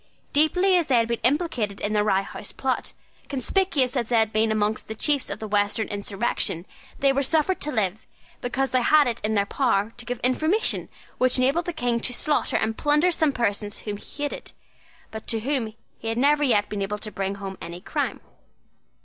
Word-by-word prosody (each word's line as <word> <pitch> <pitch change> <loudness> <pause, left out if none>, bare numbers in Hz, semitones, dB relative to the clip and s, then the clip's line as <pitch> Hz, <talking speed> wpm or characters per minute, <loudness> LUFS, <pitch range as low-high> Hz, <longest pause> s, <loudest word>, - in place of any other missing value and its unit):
Deeply 360 +6 +4
as 340 -3 +1
they 265 - +3
had 230 -1 +3
been 235 0 -1
implicated 245 - 0
in 210 - -1
the 210 -1 +3
Rye 195 -2 +2
House 200 - -8
plot, 265 -1 -2 0.4
conspicuous 280 -2 +1
as 235 -4 -1
they 240 - +2
had 220 -1 +2
been 220 +1 +2
among 215 0 +1
the 220 - -5
chiefs 285 +3 +1
of 200 - -4
the 220 - -6
Western 205 +1 +1
insurrection, 200 -4 -2 0.3
they 275 -1 +3
were 275 - +1
suffered 320 +6 +1
to 300 - -1
live, 210 -4 -1 0.3
because 260 +2 -1
they 255 - +3
had 300 +4 +5
it 235 -2 -2
in 215 +1 0
their 200 -1 +3
power 225 -3 +1
to 240 - -7
give 245 -1 -3
information 315 - +1 0.3
which 255 0 +4
enabled 275 +7 +2
the 350 - -2
King 245 -7 0
to 245 - 0
slaughter 295 +4 0
and 220 0 -1
plunder 300 +4 +3
some 315 -3 +2
persons 205 -4 -2
whom 205 -1 -4
he 290 +7 -8
hated, 290 - -5 0.6
but 220 0 -8
to 225 -1 -1
whom 240 -4 -1 0.2
he 225 - -7
had 225 0 -1
never 290 +3 +4
yet 215 -7 +3
been 205 -1 -4
able 200 +2 -2
to 215 0 -7
bring 195 -1 -2
home 195 -1 -6
any 170 +1 -7
crime. 180 - -2
235 Hz, 205 wpm, -25 LUFS, 210-285 Hz, 0.6 s, had